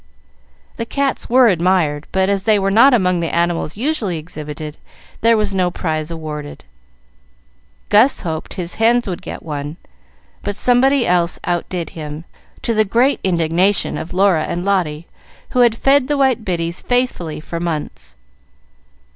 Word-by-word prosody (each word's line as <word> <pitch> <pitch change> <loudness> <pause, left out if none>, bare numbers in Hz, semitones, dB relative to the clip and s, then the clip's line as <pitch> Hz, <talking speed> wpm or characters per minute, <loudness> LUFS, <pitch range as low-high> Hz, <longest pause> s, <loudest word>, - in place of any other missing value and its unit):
The 230 - -3
cats 280 +1 -1
were 250 +1 +6
admired, 170 -5 +1
but, 190 0 +1
as 200 -1 0
they 215 -2 +4
were 195 0 0
not 235 +7 +6
among 185 -7 +2
the 165 -1 -1
animals 170 0 -1
usually 230 - -1
exhibited, 150 -1 -7 0.4
there 230 0 +4
was 210 -2 0
no 185 -2 +1
prize 155 -3 -3
awarded. 155 -3 -7 1.3
Gus 225 +6 +4
hoped 160 -3 -5
his 175 -2 -3
hens 240 +1 +3
would 180 -3 -4
get - - -8
one; 150 0 -5 0.6
but 205 - -4
somebody 250 +2 +3
else 175 -1 +1
outdid 175 0 -3
him, 155 0 -7 0.4
to 230 - 0
the 215 0 +3
great 240 +7 +2
indignation 175 +2 +1
of 160 - -6
Laura 185 -4 +2
and 175 +2 -4
Lotty, 170 -6 0 0.5
who 255 - 0
had 240 -2 +5
fed 270 +2 +3
the 295 0 0
white 265 -4 +2
biddies 170 -3 -2
faithfully 245 -11 -1
for 165 +2 -6
months. 155 - -5
185 Hz, 150 wpm, -18 LUFS, 165-230 Hz, 1.3 s, were